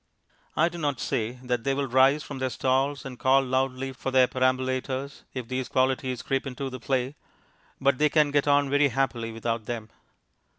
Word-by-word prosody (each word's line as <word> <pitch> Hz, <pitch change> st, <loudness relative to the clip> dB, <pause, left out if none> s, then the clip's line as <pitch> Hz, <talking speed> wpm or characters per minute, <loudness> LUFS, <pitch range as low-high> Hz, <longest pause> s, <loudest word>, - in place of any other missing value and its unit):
I 165 Hz, -, +5 dB
do 175 Hz, 0 st, -6 dB
not 145 Hz, -5 st, -1 dB
say 115 Hz, +1 st, -1 dB
that 125 Hz, -2 st, -1 dB
they 135 Hz, 0 st, +1 dB
will 140 Hz, 0 st, 0 dB
rise 135 Hz, +4 st, +4 dB
from 140 Hz, -2 st, -7 dB
their 130 Hz, 0 st, 0 dB
stalls 135 Hz, +3 st, 0 dB
and 125 Hz, -2 st, -8 dB
call 135 Hz, +1 st, +4 dB
loudly 130 Hz, 0 st, -1 dB
for 130 Hz, -, -4 dB
their 130 Hz, -1 st, +5 dB
perambulators, 130 Hz, +1 st, -1 dB
if 125 Hz, -3 st, -4 dB
these 130 Hz, +1 st, -3 dB
qualities 130 Hz, -1 st, 0 dB
creep 135 Hz, +1 st, -1 dB
into 135 Hz, +1 st, -5 dB
the 130 Hz, -, -6 dB
play, 130 Hz, +2 st, -1 dB, 0.7 s
but 135 Hz, -1 st, +2 dB
they 150 Hz, 0 st, +4 dB
can 150 Hz, -2 st, +3 dB
get 145 Hz, 0 st, +2 dB
on 145 Hz, 0 st, +4 dB
very 145 Hz, +1 st, +3 dB
happily 125 Hz, -3 st, -1 dB
without 115 Hz, 0 st, -3 dB
them. 115 Hz, -3 st, -5 dB
130 Hz, 185 wpm, -26 LUFS, 125-140 Hz, 0.7 s, I